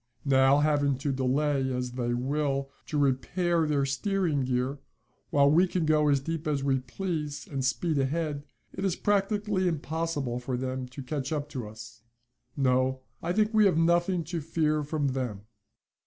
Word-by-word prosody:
Now, 135 0 +5
having 145 -2 +2
to 140 +2 -1
delay, 135 +1 +1
as 125 -1 -2
they 120 -1 -2
will, 135 +1 -1 0.2
to 150 - -2
repair 160 +5 +1
their 145 -2 +1
steering 155 -1 0
gear, 130 +2 -1 0.5
while 140 0 +4
we 175 +5 +5
can 175 -2 -1
go 155 -1 +3
as 140 -1 +4
deep 160 +2 -4
as 145 -2 0
we 135 -1 +2
please 150 0 -4
and 135 -3 -3
speed 150 +3 0
ahead, 145 +1 -1 0.3
it 190 - -5
is 190 -3 +1
practically 205 -1 +1
impossible 155 -5 -2
for 125 0 -3
them 130 0 -3
to 130 +2 -9
catch 140 +1 -3
up 150 -1 -2
to 125 -6 -5
us. 110 +2 -11 0.6
No, 130 -1 +2 0.2
I 170 - -1
think 215 +4 +1
we 215 -1 +5
have 180 - +2
nothing 170 +1 +2
to 165 +1 -4
fear 155 -1 0
from 145 -1 -1
them." 125 -6 -3
145 Hz, 170 wpm, -28 LUFS, 130-165 Hz, 0.6 s, Now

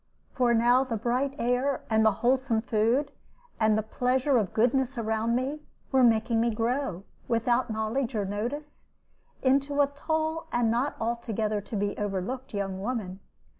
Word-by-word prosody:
For 245 -2 +2
now 240 +3 +4
the 240 -4 -3
bright 250 +5 -1
air, 250 +3 0
and 220 -1 +3
the 220 - +5
wholesome 255 -3 +2
food, 235 +6 +1 0.5
and 220 -1 +3
the 215 - 0
pleasure 255 +5 +1
of 210 -5 0
goodness 255 +3 +1
around 225 +1 0
me, 270 +5 -2 0.3
were 265 -1 +4
making 225 0 +3
me 235 - +2
grow, 230 -3 -1 0.2
without 240 +1 +1
knowledge 225 +3 -2
or 205 -2 0
notice, 245 +10 -5 0.6
into 275 +2 +2
a 285 - +6
tall 315 +3 -2
and 240 -2 +2
not 245 +5 0
altogether 225 -2 -1
to 215 - -7
be 205 0 -1
overlooked 210 +7 -3
young 195 -2 -3
woman. 205 -5 -3
235 Hz, 155 wpm, -28 LUFS, 220-265 Hz, 0.6 s, a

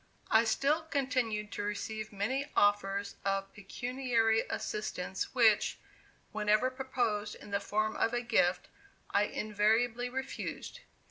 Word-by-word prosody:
I 220 +1 +6
still 280 +8 +2
continued 255 -8 -1
to - - -4
receive 215 +1 -4
many 255 +8 -1
offers 200 -1 +2
of 195 0 -1
pecuniary 230 +1 0
assistance, 190 0 -3
which, 220 -4 +4 0.5
whenever 215 +4 +2
proposed 245 -5 -1
in 205 - -12
the 200 - +1
form 215 +2 -1
of 225 - +1
a 240 0 0
gift, 190 -6 +2 0.4
I 205 - +3
invariably 220 +4 +1
refused. 265 +1 -5
220 Hz, 120 wpm, -32 LUFS, 205-245 Hz, 0.5 s, I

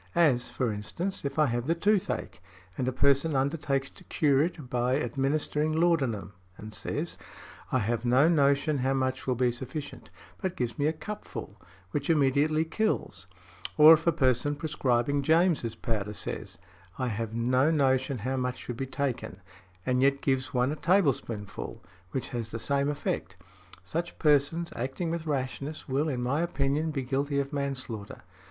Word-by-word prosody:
As, 140 -8 +3
for 120 -4 -1
instance, 170 - -4
if 140 +1 -3
I 155 - +5
have 120 -1 -1
the 165 - +2
toothache, 200 - 0 0.3
and 130 - -2
a - - +2
person 140 +4 +3
undertakes 140 0 0
to - - -15
cure 140 -3 +3
it 155 -4 -2
by 125 +1 +1
|87| 150 - 0
administering 150 +2 0
laudanum, 130 - +1 0.2
and 110 +1 -9
says, - - -4 0.5
'I - - +3
have 115 0 -1
no 125 +5 +5
notion 140 -2 +3
how 135 +1 +1
much 130 0 -1
will 130 - +2
be 125 0 +2
sufficient,' 130 +4 -7 0.3
but 185 -2 -2
gives 120 -1 -3
one 145 - +3
a 155 - +1
cupful, 205 +7 -7 0.3
which 145 +1 -2
immediately 150 +1 +3
kills; 160 - -1 0.5
or 155 +1 +10
if 165 +1 +1
a - - +7
person 145 -1 +1
prescribing 140 -3 0
James' 160 -5 +2
powder 105 -2 -3
says, - - -5 0.4
'I 130 -1 -1
have 115 0 -3
no 125 +5 +3
notion 135 -3 +2
how 130 +1 0
much 125 -1 -1
should 120 - -6
be 135 - -3
taken,' 130 -8 -3 0.5
and 125 0 +2
yet 140 +1 +3
gives 130 -1 0
one 125 +2 +1
a - - -2
tablespoonful, 125 - 0 0.3
which 130 +7 -3
has 115 -3 -4
the 115 - -4
same 140 +4 0
effect; 95 - -3 0.5
such 170 - -4
persons, 150 +3 +2
acting 135 +7 -2
with 165 -1 -3
rashness, 140 +1 -3
will, 140 +3 0
in 125 -4 -2
my 140 +6 +1
opinion, 150 -1 0
be 140 -4 -2
guilty 140 +2 0
of 140 +1 -3
manslaughter. 130 -9 -4
135 Hz, 165 wpm, -28 LUFS, 125-155 Hz, 0.5 s, or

